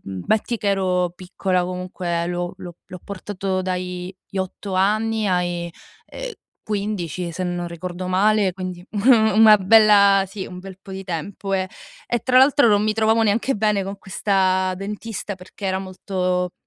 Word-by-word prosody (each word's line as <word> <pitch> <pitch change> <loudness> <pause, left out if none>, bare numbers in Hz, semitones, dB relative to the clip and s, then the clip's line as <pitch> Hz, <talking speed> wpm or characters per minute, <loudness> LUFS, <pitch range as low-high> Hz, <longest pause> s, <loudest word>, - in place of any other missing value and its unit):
Mh, 95 -1 -6
metti 220 +2 +1
che 210 -2 -2
ero 185 -2 +1
piccola, 185 0 -1
comunque 180 -1 -3
l'ho 175 0 -3
l'ho 175 -1 -10
l'ho 180 - -9
portato 195 -1 -3
dai 180 0 -4 0.2
8 190 +1 -4
anni 215 +3 +1
ai, 175 -1 -1 0.4
ehm, - - -7 0.3
15, 195 -5 -3
se 175 +3 -4
non 175 -1 -3
ricordo 175 +2 -6
male, 200 +1 +3
quindi 185 -1 -6
u 210 - -4 0.4
una 220 -1 +9
bella 200 -1 +6
sì, 195 0 -7
un 180 - -9
bel 190 0 -10
po' 195 - -13
di 190 0 -6
tempo, 190 +3 -5
eh. 185 -1 0 0.4
E 240 - 0
tra 255 -1 +3
l'altro 275 0 +5
non 205 -1 +4
mi 215 0 +1
trovavo 220 +1 +3
neanche 225 +5 +1
bene 210 -2 +1
con 195 +1 -6
questa 190 -1 +1
dentista 205 +1 -5
perché 185 +2 -9
era 190 0 0
molto, 185 -1 -2
190 Hz, 160 wpm, -22 LUFS, 180-210 Hz, 0.4 s, una